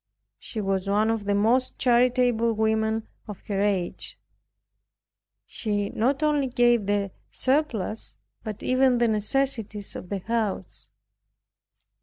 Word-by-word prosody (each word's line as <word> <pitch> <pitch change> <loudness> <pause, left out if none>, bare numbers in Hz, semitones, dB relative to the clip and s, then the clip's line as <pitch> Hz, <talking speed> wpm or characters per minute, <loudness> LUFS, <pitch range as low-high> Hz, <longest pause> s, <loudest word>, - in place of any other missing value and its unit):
She 225 - -6
was 195 -1 -1
one 215 +2 +2
of 220 -2 -2
the 205 0 +1
most 235 +5 +2
charitable 245 -2 +3
women 220 0 0 0.2
of 210 -3 -7
her 200 -1 -1
age. 195 -4 -1 1.3
She 205 -2 -2
not 265 +6 0
only 295 -3 +2
gave 240 -4 +3
the 200 -1 0 0.2
surplus, 255 -6 -1 0.3
but 215 -2 -6
even 255 0 +3
the 240 0 +3
necessities 220 -1 -1
of 180 - -8
the 200 - -1
house. 220 +1 -3
220 Hz, 120 wpm, -25 LUFS, 205-245 Hz, 1.3 s, charitable